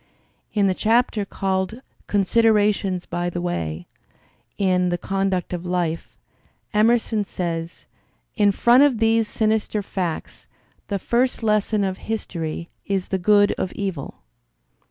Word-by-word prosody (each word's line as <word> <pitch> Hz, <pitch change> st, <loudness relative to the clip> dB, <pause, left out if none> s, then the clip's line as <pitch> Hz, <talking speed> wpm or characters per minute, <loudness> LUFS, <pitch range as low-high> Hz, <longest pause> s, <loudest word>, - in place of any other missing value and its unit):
In 205 Hz, -2 st, +3 dB
the 190 Hz, -, +3 dB
chapter 225 Hz, 0 st, +1 dB
called 190 Hz, +3 st, -2 dB, 0.3 s
"Considerations 205 Hz, -2 st, +2 dB
by 175 Hz, 0 st, -2 dB
the 175 Hz, -, -4 dB
Way" 85 Hz, -, -3 dB, 0.7 s
in 185 Hz, -2 st, +2 dB
"The 175 Hz, -, 0 dB
Conduct 195 Hz, -1 st, -1 dB
of 175 Hz, -1 st, -4 dB
Life," 175 Hz, -2 st, -2 dB, 0.6 s
Emerson 220 Hz, 0 st, +3 dB
says: 170 Hz, -3 st, -4 dB, 0.5 s
"In 205 Hz, -3 st, +4 dB
front 240 Hz, +6 st, +5 dB
of 285 Hz, -5 st, +4 dB
these 225 Hz, 0 st, +2 dB
sinister 215 Hz, -1 st, 0 dB
facts, 180 Hz, -4 st, -4 dB, 0.4 s
the 200 Hz, -, -1 dB
first 240 Hz, +4 st, 0 dB
lesson 215 Hz, -1 st, +2 dB
of 190 Hz, -1 st, -2 dB
history 170 Hz, -7 st, -4 dB, 0.2 s
is 195 Hz, -2 st, -1 dB
the 190 Hz, -, 0 dB
good 205 Hz, +2 st, +4 dB
of 185 Hz, -, -2 dB
evil." 190 Hz, -8 st, -5 dB
195 Hz, 125 wpm, -22 LUFS, 180-215 Hz, 0.7 s, front